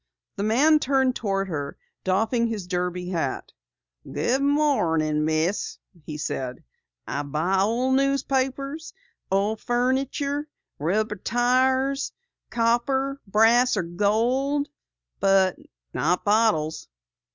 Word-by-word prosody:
The -, -, -4 dB
man 275 Hz, +9 st, +4 dB
turned 265 Hz, -2 st, +2 dB
toward 195 Hz, -3 st, -1 dB
her, 145 Hz, -4 st, -4 dB, 0.3 s
doffing 220 Hz, +5 st, +1 dB
his 215 Hz, -5 st, -4 dB
derby 180 Hz, 0 st, -2 dB
hat. 160 Hz, -7 st, -3 dB, 0.6 s
"Good 240 Hz, -, 0 dB
morning, 170 Hz, -, +2 dB
Miss," 160 Hz, +5 st, 0 dB, 0.3 s
he 150 Hz, -, -5 dB
said. 130 Hz, -4 st, -4 dB, 0.4 s
"I 140 Hz, -, -2 dB
buy 160 Hz, +7 st, 0 dB, 0.3 s
newspapers, 275 Hz, +2 st, 0 dB, 0.4 s
old 205 Hz, +3 st, +1 dB
furniture, 270 Hz, +4 st, 0 dB, 0.3 s
rubber 210 Hz, +7 st, 0 dB
tires, 260 Hz, +5 st, +1 dB, 0.4 s
copper, 265 Hz, +4 st, 0 dB
brass, 225 Hz, +4 st, +4 dB
or 190 Hz, -, +1 dB
gold, 240 Hz, -, 0 dB, 0.5 s
but 195 Hz, -1 st, +3 dB, 0.4 s
not 175 Hz, +3 st, 0 dB
bottles." 205 Hz, -8 st, +2 dB
220 Hz, 95 wpm, -25 LUFS, 180-265 Hz, 0.6 s, man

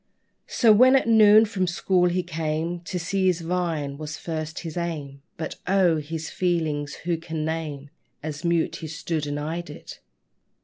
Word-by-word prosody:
So, 225 Hz, -3 st, +5 dB
when 255 Hz, +5 st, +6 dB
at 265 Hz, -, +3 dB
noon 215 Hz, -1 st, +7 dB
from 195 Hz, -4 st, -1 dB
school 180 Hz, +1 st, +2 dB
he 180 Hz, +1 st, 0 dB
came, 165 Hz, 0 st, -2 dB
To 180 Hz, -, -3 dB
see 190 Hz, +2 st, 0 dB
his 180 Hz, -2 st, +1 dB
vine 165 Hz, -5 st, -2 dB
was 150 Hz, 0 st, -5 dB
first 155 Hz, -2 st, -5 dB
his 165 Hz, -3 st, -7 dB
aim: 150 Hz, -5 st, -4 dB, 0.2 s
But 160 Hz, -2 st, -5 dB
oh! 185 Hz, -4 st, +3 dB
his 155 Hz, +1 st, -5 dB
feelings 160 Hz, -5 st, -1 dB
who 170 Hz, -1 st, +1 dB
can 160 Hz, -1 st, -4 dB
name, 150 Hz, -3 st, -4 dB, 0.3 s
As 150 Hz, 0 st, -5 dB
mute 170 Hz, -1 st, +1 dB
he 160 Hz, -, -7 dB
stood 155 Hz, -1 st, -3 dB
and 145 Hz, 0 st, -3 dB
eyed 165 Hz, +3 st, -4 dB
it? 150 Hz, -, -10 dB
165 Hz, 170 wpm, -25 LUFS, 155-180 Hz, 0.3 s, noon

